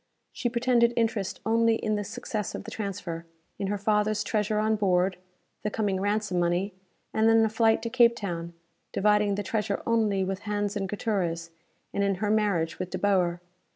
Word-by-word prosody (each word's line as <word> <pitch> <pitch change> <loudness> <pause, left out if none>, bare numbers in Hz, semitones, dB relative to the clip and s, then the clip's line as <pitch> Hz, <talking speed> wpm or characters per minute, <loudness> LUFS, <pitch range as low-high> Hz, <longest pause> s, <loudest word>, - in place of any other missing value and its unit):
She 245 - -2
pretended 235 0 +3
interest 220 -4 0
only 230 0 +3
in 215 -1 -1
the 205 0 -1
success 210 +1 -4
of - - -6
the - - -8
transfer; 185 -5 -5 0.3
in 195 - -1
her 205 +1 -1
father's 210 +1 +1
treasure 210 0 0
on 215 +1 +2
board, 185 -2 +2 0.5
the 210 - -1
coming 200 -3 -1
ransom 205 -2 0
money, 175 +3 0 0.4
and 220 +1 +4
then 225 0 +5
a - - +1
flight 225 0 +2
to 230 - -2
Cape 235 -1 +5
Town, 170 -5 -4 0.4
dividing 210 0 +3
the 205 - -2
treasure 205 0 -2
only 215 -4 +2
with 190 0 -2
Hans 205 0 -1
and 195 -2 -2
Gutierrez; 175 -6 -2 0.4
and 200 - +1
in 200 -1 +2
her 210 +2 -1
marriage 200 -7 +1
with 185 -1 -3
De - - -3
Boer. 180 -4 +1
205 Hz, 185 wpm, -27 LUFS, 190-220 Hz, 0.5 s, then